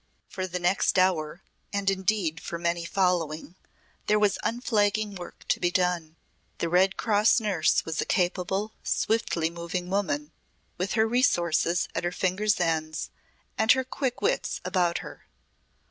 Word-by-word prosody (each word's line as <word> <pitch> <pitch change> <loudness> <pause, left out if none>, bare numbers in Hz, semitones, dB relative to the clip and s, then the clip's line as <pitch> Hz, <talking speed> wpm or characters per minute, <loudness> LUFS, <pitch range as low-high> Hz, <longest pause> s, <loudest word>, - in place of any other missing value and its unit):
For 185 -1 -4
the 180 0 -3
next 180 +2 +1
hour, 175 -2 +1 0.3
and 200 -1 -2
indeed 190 -4 +1
for 170 - -5
many 170 0 -1
following, 170 -4 0 0.5
there 210 - +4
was 210 -1 +2
unflagging 215 -3 0
work 180 -2 -10
to - - +2
be 175 - +2
done. 175 -3 0 0.4
The 170 - -1
Red 185 +3 +3
Cross 215 +1 +3
Nurse 195 -8 +1
was 160 -2 -2
a - - -2
capable, 190 +3 0
swiftly 170 -7 0
moving 175 +1 -4
woman, 160 -7 -1 0.4
with 185 +2 -2
her 220 0 +3
resources 175 - +2
at - - -2
her 175 - 0
finger's 195 +4 0
ends, 160 -2 -1 0.5
and 220 +1 +5
her 260 0 0
quick 255 -5 -3
wits - - 0
about 180 -2 +1
her. - - -11
185 Hz, 145 wpm, -27 LUFS, 170-205 Hz, 0.5 s, and